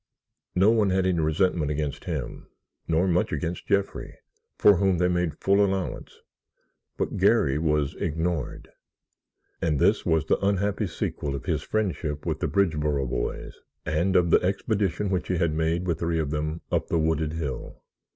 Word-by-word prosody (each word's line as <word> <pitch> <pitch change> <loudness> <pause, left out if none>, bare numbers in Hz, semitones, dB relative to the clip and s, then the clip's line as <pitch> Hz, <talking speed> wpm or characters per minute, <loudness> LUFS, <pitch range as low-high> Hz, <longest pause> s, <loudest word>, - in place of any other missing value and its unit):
No 95 +4 +5
one 110 -3 +3
had 95 0 +1
any 90 -2 +1
resentment 80 0 +1
against 75 -1 -3
him, - - -5 0.4
nor 85 +3 +2
much 90 -1 +1
against 80 +4 -3
Jeffrey, 100 0 -1 0.4
for 100 -2 +6
whom 95 -1 +2
they 90 +1 +2
made 90 -4 0
full 100 +1 +3
allowance, 95 -2 -3 0.8
but - - -2
Garry 70 +2 +3
was 75 -3 +1
ignored, 80 +1 -3 0.9
and 75 -3 +1
this - - +3
was 80 -1 +1
the 80 - 0
unhappy 100 +1 +1
sequel 70 -4 -3
of 70 - -7
his - - 0
friendship 85 -9 -2
with 80 -2 -2
the - - 0
Bridgeboro 75 -8 +1
boys - - -4 0.3
and 85 +4 0
of 85 -2 +4
the - - +5
expedition 100 0 -1
which 90 -1 -1
he 90 - 0
had 80 -2 +1
made 80 +3 0
with 85 -3 -1
three 85 0 0
of 75 -3 -1
them 75 +2 -2
up - - 0
the 85 - 0
wooded 80 -1 0
hill. 75 -5 -5
85 Hz, 165 wpm, -26 LUFS, 75-95 Hz, 0.9 s, for